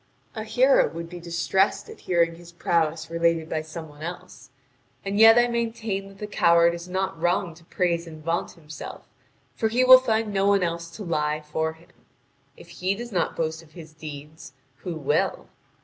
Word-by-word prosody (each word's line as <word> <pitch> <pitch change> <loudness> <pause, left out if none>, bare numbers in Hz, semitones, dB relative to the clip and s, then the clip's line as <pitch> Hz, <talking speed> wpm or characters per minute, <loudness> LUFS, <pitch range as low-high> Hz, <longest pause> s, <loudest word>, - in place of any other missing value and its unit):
A 220 -2 -5
hero 260 +4 +4
would 165 0 -8
be 175 - -7
distressed 170 - 0
at 445 - -11
hearing 170 -2 +1
his 170 +1 -13
prowess 165 -1 -1
related 170 -1 +1
by 160 -1 -2
some 160 +1 -8
one 145 0 -16
else. 170 +3 -8 0.6
And 200 +1 -1
yet 225 +1 +9
I 240 0 +5
maintain 225 -4 -2
that 195 0 -15
the 210 - -5
coward 170 -4 +4
is 170 +1 -8
not 190 -2 -2
wrong 175 0 +1
to 165 +1 -19
praise 170 -1 -1
and 155 -1 -11
vaunt 165 +2 -2
himself, 155 -2 -10 0.5
for 220 - 0
he 240 +3 +2
will 255 0 +10
find 225 -4 -1
no 195 0 +2
one 200 -2 +3
else 170 0 -3
to 215 - -6
lie 150 -3 -1
for 160 +1 -2
him. 165 +2 -21 0.7
If - - -14
he 185 +2 -2
does 240 +2 -7
not 175 -4 -1
boast 160 0 -2
of 155 -2 -20
his 160 -3 -12
deeds, 155 -1 -10 0.2
who 180 -3 -6
will? 145 -1 -1
170 Hz, 190 wpm, -25 LUFS, 160-200 Hz, 0.7 s, will